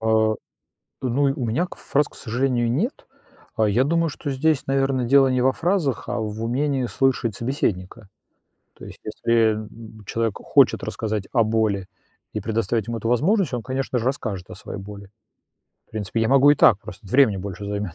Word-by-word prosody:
А, 110 - -4 1.0
ну, 130 +2 0
у 135 -3 0
меня 125 +11 0
к - - -11
фраз, 145 +1 0
к - - -19
сожалению, 120 0 0
нет. 210 - -2 0.5
А 110 - +2
я 120 +6 +3
думаю, 165 +2 +1
что 145 - -6
здесь, 150 +2 +1
наверно, 135 -2 +1
дело 135 +2 +5
не 130 -1 +1
во 130 +1 +4
фразах, 165 -2 -1
а - - -1
в 110 +1 -4
умении 130 +2 0
слышать 120 -4 0
собеседника. 110 -5 -3 0.7
То - - -11
есть - - -11
если, 115 -1 +2
м 110 0 -6 0.3
м, - - -15
человек 115 -2 -1
хочет - - +3
рассказать 105 -3 -3
о 115 -4 +4
боли, 110 -4 0 0.5
и 105 - -3
предоставить 110 0 -1
ему 115 -1 -3
эту 115 - -3
возможность, 160 - +2
он, 120 - -3
конечно 130 0 -3
же, 115 - -3
расскажет 105 -9 -3
о - - -7
своей 100 - -8
боли. 100 0 -10 0.8
В - - -36
принципе, 110 +1 -3
я 115 - +1
могу 135 +2 +6
и 145 - +4
так, 105 - +6
просто 95 +2 -11
времени 110 -2 +4
больше 100 +1 -6
займёт. 100 -4 -4
120 Hz, 185 wpm, -23 LUFS, 105-135 Hz, 1.0 s, могу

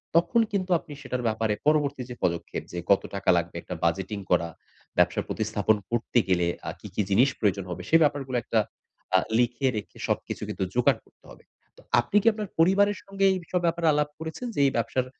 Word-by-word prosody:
তখন 175 +8 +4
কিন্তু 185 -2 -1
আপনি 150 - -11
সেটার 125 -2 -3
ব্যাপারে 110 -1 0
পরবর্তী 145 -4 +2
যে 120 - -6
পদক্ষেপ 85 -1 -1
যে 85 - -4
কত 100 - +5
টাকা 100 -1 -1
লাগবে, 85 0 -2
একটা 90 - -6
বাজেটিং 95 +5 -1
করা, 85 -1 +3 0.5
ব্যবসার - - +2
প্রতিস্থাপন 110 -1 +1 0.2
করতে 120 +1 +1
গেলে 90 -2 +2 0.2
আ - - -2
কি, - - -9
কি - - +2
জিনিস 120 +8 +5
প্রয়োজন 100 -2 +1
হবে? 90 - -5
সেই 165 - +6
ব্যাপারগুলো 135 -4 0
একটা 110 - +1 0.6
আ - - +5 0.2
লিখে 120 +2 +1
রেখে 105 - -7
সবকিছু - - -2
কিন্তু - - -2
যোগাড় 125 - +3
করতে - - -28
হবে। - - -15 0.3
তো - - -16 0.2
আপনি 120 - -3
কি 230 - -1
আপনার 210 -2 -4
পরিবারের 200 +4 +4
সঙ্গে 195 0 -1
এইসব 180 0 -2
ব্যাপারে 170 0 +1
আলাপ 150 0 +1
করেছেন? 160 +10 -5
যে - - -2
এই - - +1
ব্যবসার 115 +3 0
125 Hz, 195 wpm, -26 LUFS, 100-165 Hz, 0.6 s, সেই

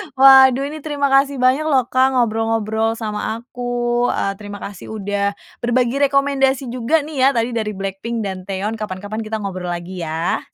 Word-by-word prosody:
Waduh, 265 0 +7
ini 310 - -7
terima 285 -2 -1
kasih 275 +1 +3
banyak 260 +5 +2
loh, 260 -5 +1
Kak, 260 +1 +3
ngobrol-ngobrol 225 -1 0
sama 220 -1 -3
aku. 240 0 -2
Eee, 195 - 0
terima 205 -1 -8
kasih, 200 -2 -8
udah 200 0 -1 0.2
berbagi 245 +2 +1
rekomendasi 270 -2 +1
juga 260 +6 +1
nih 310 0 -8
ya. 260 - +5
Tadi 230 +1 0
dari 215 -3 -2
BLACKPINK 195 +4 -4
dan 190 -2 -3
Taeyeon. 205 +3 -3
Kapan-kapan, 205 +1 -5
kita 215 -1 -4
ngobrol 185 -2 -4
lagi 175 +1 -5
ya. 165 +1 -1
230 Hz, 165 wpm, -19 LUFS, 205-265 Hz, 0.2 s, Waduh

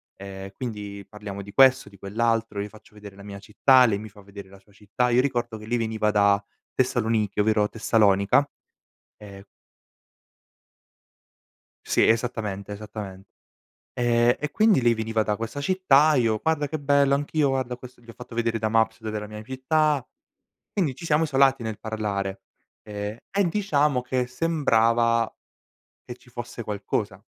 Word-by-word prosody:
ehm, 95 0 -8
quindi 105 -4 -6
parliamo 105 -2 -8
di 100 - -11
questo, 130 +3 +5
di 100 - -17
quell'altro, 115 +1 -1
io 105 - -5
faccio 105 0 -18
vedere 105 -1 -12
la 100 - -13
mia 100 -1 -8
città, 125 +6 +4
lei 100 -3 +1
mi 110 0 -9
fa 100 0 -16
vedere 100 -1 -11
la 100 - -15
sua 100 - -27
città. 105 +4 -2
Io 125 +1 +4
ricordo 120 -4 -2
che 110 - -11
lei 120 +1 0
veniva 110 -2 -1
da 100 -1 +3 0.3
Tessaloniki, 115 -5 0
ovvero 105 0 +2
Tessalonica, 110 +3 +2 0.7
ehm 100 -2 -12 2.4
Sì, - - +3
esattamente, 110 -4 -1
esattamen 100 -2 -8 0.7
ehm, 120 0 +2
e 150 - -4
quindi 215 - +3
lei 120 -1 +4
veniva 110 0 -1
da 105 -1 -1
questa 115 +5 -5
città, 155 -3 +4
io: 115 -4 +1
"Guarda 160 -2 0
che 155 +1 -5
bello, 140 -1 +3
anch'io 145 0 0
guarda 130 -2 -2
ho - - -10
questo" 125 0 -13
gli 120 - -23
ho - - -14
fatto 125 -1 -11
vedere 115 -1 0
da 110 0 -1
Maps 110 0 +1
dov'è 110 -1 -5
la 105 - -8
mia 105 0 -8
città. 140 +2 0 0.7
Quindi 150 -10 -1
ci 170 - -10
siamo 155 -1 +2
isolati 135 -4 +3
nel 110 -2 -5
parlare, 100 -3 -3 0.4
ehm, 105 +1 -6
e 195 -2 +1
diciamo 150 -9 +1
che 125 0 -1
sembrava 115 -5 +1 0.7
che 125 - -7
ci 125 - -21
fosse 120 0 -7
qualcosa. 105 -1 -3
115 Hz, 160 wpm, -25 LUFS, 105-130 Hz, 2.4 s, questo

